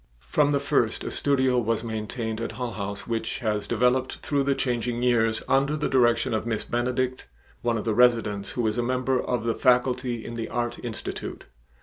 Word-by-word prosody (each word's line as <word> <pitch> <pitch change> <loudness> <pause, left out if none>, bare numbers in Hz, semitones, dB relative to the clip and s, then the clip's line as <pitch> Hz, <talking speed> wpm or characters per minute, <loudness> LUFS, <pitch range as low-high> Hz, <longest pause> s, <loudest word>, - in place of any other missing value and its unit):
From 145 -1 +3
the 140 - +2
first 120 -5 +1
a - - -4
studio 130 -3 +2
was 115 -1 0
maintained 110 0 -3
at 115 - -3
Hull 125 +1 -3
House 100 -1 -5
which 115 -1 -2
has 105 -4 -1
developed 125 +3 +1
through 145 -2 -1
the 140 0 +1
changing 120 -2 -1
years 115 -3 +2
under 140 +3 +2
the 150 - 0
direction 120 -4 +3
of 110 +1 -1
Miss 110 -2 -1
Benedict, 125 - -1 0.3
one 120 -1 +1
of 105 - -4
the 110 - +1
residents 110 -4 +2
who 120 - -1
is 110 +2 0
a - - +3
member 130 +1 0
of 125 -3 -1
the 115 0 +1
faculty 125 -2 +1
in 115 - -6
the 115 -1 -4
Art 120 0 -3
Institute. 115 -2 -5
120 Hz, 195 wpm, -26 LUFS, 110-130 Hz, 0.3 s, From